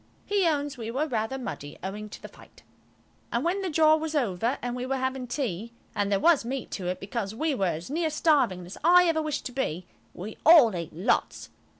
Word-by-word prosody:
He 400 Hz, -3 st, +2 dB
owns 290 Hz, -4 st, -1 dB
we 225 Hz, -1 st, -4 dB
were 265 Hz, +6 st, 0 dB
rather 235 Hz, -2 st, -2 dB
muddy, 150 Hz, -, -7 dB
owing 210 Hz, +3 st, -5 dB
to -, -, -10 dB
the -, -, -9 dB
fight. -, -, -18 dB, 0.7 s
And -, -, -1 dB
when 370 Hz, +4 st, 0 dB
the 380 Hz, -, -2 dB
jaw 310 Hz, 0 st, +5 dB
was 315 Hz, 0 st, -4 dB
over 235 Hz, -2 st, 0 dB
and 245 Hz, 0 st, -4 dB
we 250 Hz, -, -4 dB
were 265 Hz, +1 st, -1 dB
having 260 Hz, -1 st, -2 dB
tea–and 230 Hz, -, -4 dB
there 200 Hz, -, +3 dB
was 335 Hz, -1 st, +4 dB
meat 260 Hz, +2 st, -5 dB
to 185 Hz, -3 st, -4 dB
it, 180 Hz, 0 st, -2 dB
because 205 Hz, 0 st, -4 dB
we 310 Hz, +5 st, 0 dB
were 195 Hz, -8 st, 0 dB
as 170 Hz, -, -8 dB
near 320 Hz, +1 st, 0 dB
starving 280 Hz, -, +2 dB
as 180 Hz, -, -10 dB
I 355 Hz, +2 st, +6 dB
ever 320 Hz, -1 st, +2 dB
wish 305 Hz, -2 st, -2 dB
to -, -, -6 dB
be–we 185 Hz, -3 st, -6 dB
all 290 Hz, -, +7 dB
ate 170 Hz, -2 st, -5 dB
lots. 180 Hz, +9 st, -1 dB
255 Hz, 210 wpm, -27 LUFS, 205-310 Hz, 0.7 s, all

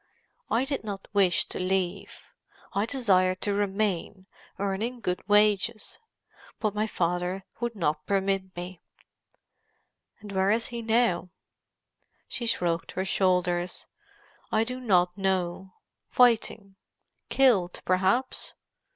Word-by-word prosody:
I 245 Hz, +3 st, +2 dB
did 275 Hz, -3 st, -3 dB
not 200 Hz, -2 st, -6 dB
wish 190 Hz, -4 st, +3 dB
to -, -, -6 dB
leave. 185 Hz, +1 st, -2 dB, 0.5 s
I 200 Hz, +3 st, 0 dB
desired 185 Hz, -8 st, +2 dB
to 205 Hz, -, +1 dB
remain, 200 Hz, -2 st, -1 dB, 0.3 s
earning 205 Hz, +5 st, -2 dB
good 180 Hz, -5 st, -2 dB
wages. 210 Hz, +1 st, +2 dB, 0.6 s
But 215 Hz, -2 st, 0 dB
my 210 Hz, +1 st, 0 dB
father 180 Hz, 0 st, -1 dB, 0.2 s
would 240 Hz, -1 st, -2 dB
not 155 Hz, -5 st, -1 dB
permit 195 Hz, -1 st, 0 dB
me." 175 Hz, 0 st, -7 dB, 1.4 s
"And 205 Hz, -1 st, -10 dB
where 190 Hz, 0 st, +2 dB
is 225 Hz, +2 st, +1 dB
he 235 Hz, -1 st, -5 dB
now?" 225 Hz, -6 st, +2 dB, 1.0 s
She 235 Hz, -, -3 dB
shrugged 170 Hz, -6 st, 0 dB
her 190 Hz, -, -2 dB
shoulders. 180 Hz, -2 st, +1 dB, 0.7 s
"I 220 Hz, -, +3 dB
do 250 Hz, +2 st, -4 dB
not 180 Hz, -7 st, +2 dB
know. 190 Hz, -1 st, -1 dB, 0.4 s
Fighting: 220 Hz, -5 st, +2 dB, 0.5 s
killed, 220 Hz, -10 st, +3 dB
perhaps. 190 Hz, +8 st, +1 dB
195 Hz, 115 wpm, -27 LUFS, 185-220 Hz, 1.4 s, wish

